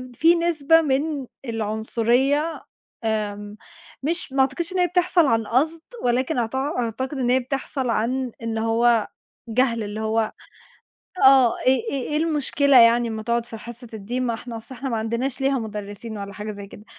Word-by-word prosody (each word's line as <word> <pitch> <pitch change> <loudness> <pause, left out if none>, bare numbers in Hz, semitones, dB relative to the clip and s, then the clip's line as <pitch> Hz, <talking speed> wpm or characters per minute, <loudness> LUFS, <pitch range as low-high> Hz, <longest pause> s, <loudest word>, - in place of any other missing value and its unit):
في 330 +7 +5
نسبة 330 -2 +3
من 285 -1 -1 0.2
العنصرية 235 +7 0 0.4
آمم، 210 -1 -3 0.5
مش 330 -1 -2
ما 270 - +3
أعتقدش 300 +7 -1
إن 370 - 0
هي 355 - +4
بتحصل 360 -2 +3
عن 225 -3 +1
قصد، 315 +7 +1 0.2
ولكن 255 +5 +1
أعت 230 +1 -2
أعتقد 260 0 -2
إن 245 -2 0
هي 255 +1 +4
بتحصل 260 0 -3
عن 250 +3 0
إن 225 -1 -2
هو 225 0 +2 0.4
جهل 230 -1 +1
اللي 205 +1 -5
هو 220 0 0 0.9
آه، 265 -3 +6
إيه 260 +7 +4
إيه 265 -3 -3
إيه 300 - -1
المشكلة 290 -3 +2
يعني 235 0 +5
ما 220 -1 -4
تقعد 235 +1 -1
في 225 - -8
حصة 235 +2 -10
الدين، 225 +5 -3
ما 235 - 0
إحنا 230 +1 -7
أصل 225 +4 -9
إحنا 265 +2 -5
ما 235 - -1
عندناش 235 +5 -2
ليها 270 0 +2
مدرّسين 210 0 -6
ولا 200 0 -6
حاجة 210 +2 -5
زي 200 -1 -9
كده، 205 +1 -13
245 Hz, 170 wpm, -23 LUFS, 225-275 Hz, 0.9 s, آه